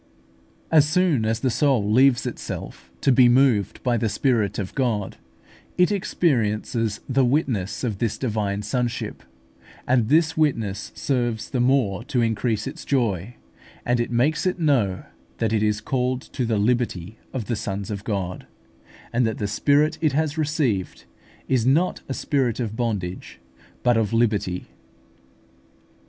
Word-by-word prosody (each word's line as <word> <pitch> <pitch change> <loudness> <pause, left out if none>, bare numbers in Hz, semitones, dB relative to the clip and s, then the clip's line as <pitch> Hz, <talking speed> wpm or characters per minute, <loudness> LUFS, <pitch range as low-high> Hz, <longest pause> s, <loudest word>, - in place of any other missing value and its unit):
As 150 -2 +5
soon 160 -9 +2
as 110 +1 -1
the 130 - +1
soul 120 -6 +2
leaves 130 +2 +4
itself 115 - -6
to - - +3
be 125 -1 +6
moved 120 -5 +2
by 120 -2 +2
the 115 -1 0
Spirit 110 -1 +1
of 95 -2 -4
God, 115 -7 -1 0.6
it 180 +2 +4
experiences 115 - 0
the 135 0 +2
witness 125 - 0
of 110 -6 -2
this 110 -2 -1
divine 105 -4 -2
sonship; 120 +3 -2 0.7
and 120 -3 +2
this 160 +1 +3
witness 115 -10 -1
serves 120 -5 -1
the 130 - -1
more 120 -5 +2
to 130 -2 -1
increase 110 -1 0
its 150 +5 -7
joy, 115 -5 -1 0.5
as 120 0 +1
it 120 - -1
makes 140 +9 +1
it 185 - 0
know 130 - +1 0.3
that 110 -1 0
it 110 - +2
is 105 0 +1
called 125 +1 -1
to 125 - -1
the 115 -2 0
liberty 110 -3 -1
of 125 -5 -4
the 120 - -1
sons 100 -1 -4
of 100 -1 -5
God, 95 -5 -3 0.7
and 120 +1 +2
that 110 - -3
the 105 - -2
spirit 145 +9 +2
it 155 -4 +2
has 155 +1 0
received 145 - -1 0.4
is 130 -4 +2
not 150 +9 +2
a 135 - -2
spirit 130 -6 0
of 110 -3 -3
bondage, 105 -7 -3 0.4
but 120 -2 +4
of 110 0 0
liberty. 105 -6 0
120 Hz, 150 wpm, -23 LUFS, 105-135 Hz, 0.7 s, be